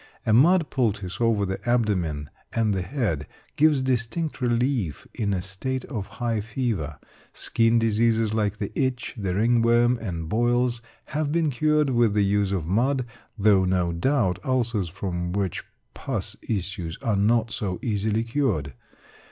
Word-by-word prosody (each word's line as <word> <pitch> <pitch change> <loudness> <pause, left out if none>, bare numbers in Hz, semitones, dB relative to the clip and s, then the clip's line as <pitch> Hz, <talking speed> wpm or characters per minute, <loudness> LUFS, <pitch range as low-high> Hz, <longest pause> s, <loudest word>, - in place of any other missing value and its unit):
A 110 - +3
mud 165 +7 +5
poultice 105 -6 -1
over 110 -3 +2
the 95 0 -4
abdomen 90 -12 0 0.2
and 110 -2 +1
the 95 - -1
head, 90 - -2 0.3
gives 150 -3 +4
distinct 130 +5 -1
relief 120 - 0
in 105 -3 -1
a 90 -2 -1
state 125 +7 -3
of 105 -8 -5
high 115 -3 0
fever. 110 - -3 0.4
Skin 115 0 +2
diseases 115 -1 +2
like 105 -2 0
the 100 - -4
itch, 130 -2 -1
the 95 -6 -2
ringworm, 120 +2 +3
and 85 -7 -4
boils, 120 +3 +1 0.3
have 150 -1 0
been 160 -2 +1
cured 150 +1 +2
with 120 -4 +3
the 105 -1 +3
use 100 0 +1
of 90 -6 -1
mud, 125 - +1 0.3
though 100 -2 +4
no 90 -2 +1
doubt 95 +1 +1
ulcers 115 -8 0
from 85 -1 -3
which 95 -3 -2 0.3
pus - - -4
issues 90 -5 -3
are 115 -5 +1
not 115 +3 +2
so 95 -4 -3
easily 110 0 0
cured. 115 - -1
110 Hz, 150 wpm, -25 LUFS, 95-125 Hz, 0.4 s, mud